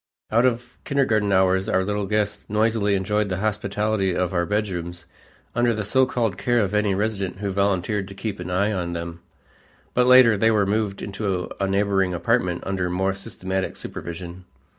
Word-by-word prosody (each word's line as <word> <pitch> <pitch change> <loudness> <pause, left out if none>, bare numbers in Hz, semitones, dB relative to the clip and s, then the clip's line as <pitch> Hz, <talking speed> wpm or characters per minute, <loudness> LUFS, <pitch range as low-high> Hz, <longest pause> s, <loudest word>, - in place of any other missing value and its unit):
Out 115 +3 +4
of 120 0 -3
kindergarten 110 -7 +1
hours 95 0 +3
our 95 - +2
little 105 0 -2
guests 105 0 -1
noisily 105 -1 +2
enjoyed 105 +2 0
the 95 - -2
hospitality 105 -1 -1
of 90 0 -1
our 85 -1 0
bedrooms 90 -5 -3 0.5
under 120 -1 +2
the 105 -1 -3
so 130 +5 +3
called 115 -7 -1
care 120 +4 +1
of 100 -2 0
any 105 -2 +2
resident 100 -2 -2
who 100 0 -3
volunteered 100 +1 0
to 95 - -10
keep 105 -1 -4
an 90 0 -6
eye 100 +4 +1
on 90 -4 -2
them, 85 0 -5 0.7
but 125 0 +3
later 125 -4 +7
they 115 +3 +3
were 105 -2 +3
moved 100 -1 -1
into 100 -3 -3
a 100 - +1
neighboring 95 -2 +1
apartment 90 -1 0
under 95 -2 -1
more 95 +2 0
systematic 95 -2 -4
supervision. 85 +1 -8
100 Hz, 175 wpm, -23 LUFS, 95-110 Hz, 0.7 s, later